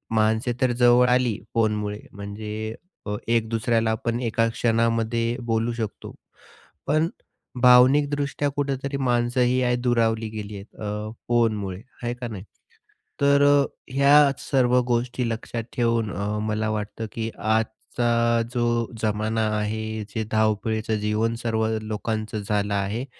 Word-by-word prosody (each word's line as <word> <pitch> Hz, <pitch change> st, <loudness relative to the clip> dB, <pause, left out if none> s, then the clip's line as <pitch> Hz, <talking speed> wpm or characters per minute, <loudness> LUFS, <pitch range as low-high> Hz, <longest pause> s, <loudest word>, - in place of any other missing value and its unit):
माणसे 110 Hz, +3 st, +2 dB
तर 130 Hz, -1 st, +3 dB
जवळ 120 Hz, +1 st, +6 dB
आली 125 Hz, -4 st, +2 dB
फोनमुळे 105 Hz, -2 st, 0 dB
म्हणजे 105 Hz, +2 st, -6 dB, 0.3 s
अ, 105 Hz, -, -1 dB
एक 115 Hz, -1 st, +1 dB
दुसऱ्याला 115 Hz, 0 st, +1 dB
आपण 115 Hz, +1 st, -2 dB
एका 115 Hz, -1 st, +1 dB
क्षणामध्ये 115 Hz, 0 st, +1 dB, 0.2 s
बोलू 115 Hz, +1 st, +1 dB
शकतो. 110 Hz, -3 st, -6 dB, 0.7 s
पण 155 Hz, +3 st, +2 dB, 0.5 s
भावनिकदृष्ट्या 140 Hz, +3 st, +4 dB
कुठेतरी 140 Hz, -1 st, -2 dB
माणसंही 125 Hz, -1 st, +1 dB
या 125 Hz, -1 st, +2 dB
दुरावली 115 Hz, -2 st, +1 dB
गेली 105 Hz, -1 st, -6 dB
आहेत. 100 Hz, +2 st, -12 dB
अ. 105 Hz, 0 st, -4 dB, 0.2 s
फोनमुळे. 105 Hz, -6 st, +1 dB, 0.2 s
आहे 120 Hz, 0 st, -1 dB
का 125 Hz, 0 st, -6 dB
नाही? 100 Hz, -5 st, -7 dB, 0.8 s
तर 140 Hz, 0 st, +5 dB
अ, 145 Hz, -1 st, +5 dB, 0.3 s
ह्या 140 Hz, +1 st, +6 dB
सर्व 125 Hz, -2 st, +2 dB
गोष्टी 120 Hz, +1 st, 0 dB
लक्षात 115 Hz, +1 st, -4 dB
ठेवून 115 Hz, -3 st, +1 dB
अ, 100 Hz, +1 st, -2 dB, 0.2 s
मला 110 Hz, 0 st, -1 dB
वाटतं, 110 Hz, +1 st, -4 dB
की 115 Hz, 0 st, -3 dB
आजचा 115 Hz, +1 st, 0 dB
जो 120 Hz, -1 st, +1 dB
जमाना 110 Hz, +1 st, 0 dB, 0.2 s
आहे, 110 Hz, +1 st, -3 dB
जे 110 Hz, +2 st, -3 dB
धावपळीचं 110 Hz, 0 st, +1 dB
जीवन 105 Hz, +2 st, 0 dB
सर्व 110 Hz, -1 st, 0 dB
लोकांचं 110 Hz, 0 st, -3 dB
झालं 105 Hz, -1 st, 0 dB
आहे. 100 Hz, +5 st, -2 dB
115 Hz, 125 wpm, -24 LUFS, 110-120 Hz, 0.8 s, जवळ